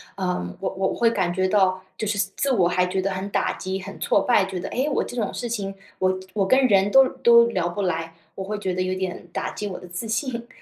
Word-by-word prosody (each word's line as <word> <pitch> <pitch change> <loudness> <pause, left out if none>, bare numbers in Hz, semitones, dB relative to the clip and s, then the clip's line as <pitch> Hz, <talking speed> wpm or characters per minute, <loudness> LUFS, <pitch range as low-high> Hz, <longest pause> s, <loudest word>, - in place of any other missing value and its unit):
呃， 180 - -2
我 195 - 0
我 190 0 -1
会 230 -1 +2
感 185 -5 0
觉 185 +1 +1
到 185 -1 +2
就 215 - -2
是 205 0 -1 0.2
自 275 -2 +1
我 180 -6 +3
还 180 0 +2
觉 190 +1 -1
得 195 +1 -1
很 190 +1 -4
打 - - +1
击、 190 0 -4
很 - - -9
挫 200 - +2
败。 205 -3 +3
觉 190 -1 -5
得： 180 +2 -4
诶， 260 +4 -1
我 290 - +1
这 245 - -8
种 220 -4 -1
事 240 - -4
情 200 -4 -3 0.2
我， 185 0 +1 0.2
我 195 -3 +1
跟 260 +4 +4
人 195 -1 +4
都 270 +5 +7
都 235 -3 +5
聊 185 -7 -1
不 175 +4 -3
来。 165 -3 -2 0.2
我 190 - -5
会 210 +2 -3
觉 190 -3 -2
得 185 - -1
有 185 0 -1
点 185 -1 -4
打 - - -2
击 210 - -5
我 195 - -5
的 - - -11
自 180 +6 -5
信。 235 +1 -2
195 Hz, 275 characters per minute, -24 LUFS, 185-225 Hz, 0.2 s, 都